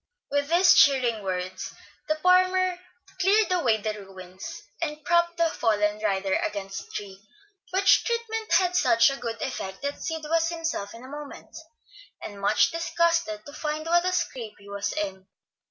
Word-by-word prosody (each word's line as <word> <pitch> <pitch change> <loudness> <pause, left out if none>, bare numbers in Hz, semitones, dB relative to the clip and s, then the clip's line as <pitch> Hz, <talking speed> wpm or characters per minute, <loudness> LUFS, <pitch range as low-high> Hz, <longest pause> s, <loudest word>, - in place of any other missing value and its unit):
With 285 0 0
these 350 +2 +6
cheering 250 -6 +4
words, 185 -1 -4 0.3
the 310 - +1
farmer 365 +2 +3 0.4
cleared 400 +2 +3
away 260 -12 +2
the 215 0 -3
ruins, 185 -1 -10 0.2
and 300 -2 -4
propped 340 0 +2
the 335 - +3
fallen 210 -7 0
rider 195 -2 0
against 195 -2 -4
a - - -17
tree; 195 -2 -7 0.5
which 385 +1 +4
treatment 455 -2 -3
had 360 -1 +3
such 235 -4 +4
a 275 - -4
good 230 -2 -5
effect 190 -6 -5
that 285 0 -3
Sid 320 -1 -4
was 330 +2 +1
himself 325 -12 -4
in 230 - -12
a - - -10
moment, 290 +1 -10 0.6
and 200 -1 -9
much 200 - +3
disgusted 335 -9 0
to 285 - -11
find 305 +1 -3
what 345 +1 +3
a 365 - 0
scrape 255 -12 -3
he 200 - -17
was 200 0 -3
in. 190 -2 -4
285 Hz, 165 wpm, -26 LUFS, 205-340 Hz, 0.6 s, these